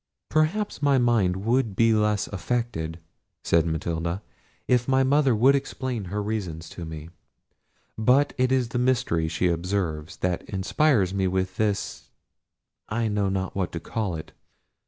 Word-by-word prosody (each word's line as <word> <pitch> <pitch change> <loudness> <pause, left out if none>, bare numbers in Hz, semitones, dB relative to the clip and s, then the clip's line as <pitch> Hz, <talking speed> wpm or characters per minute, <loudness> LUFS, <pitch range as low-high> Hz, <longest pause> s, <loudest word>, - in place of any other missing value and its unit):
"Perhaps 155 +5 0
my 140 -2 +4
mind 105 -6 +2
would 115 -3 +1
be 115 +1 +4
less 105 -1 +2
affected," 100 -6 -2 0.5
said 85 0 +3
Matilda, 85 +4 -2 0.4
"if 125 -1 +2
my 135 0 +3
mother 135 -2 +3
would 130 +6 +5
explain 130 -5 -2
her 105 +3 -3
reasons 90 -7 -4
to 85 - -7
me: 80 0 -8 0.9
but 130 +6 +4
it 130 0 +1
is 130 -3 +2
the 120 - -2
mystery 125 -11 +1
she 85 +3 0
observes, 85 -2 -2
that 90 -1 -1
inspires 100 +1 +2
me 95 -1 +1
with 95 0 -1
this—I 110 +1 -4
know 105 -2 0
not 95 -1 -2
what 95 -2 -1
to 85 - -3
call 100 +1 -3
it. 80 - -8
105 Hz, 145 wpm, -25 LUFS, 90-125 Hz, 0.9 s, would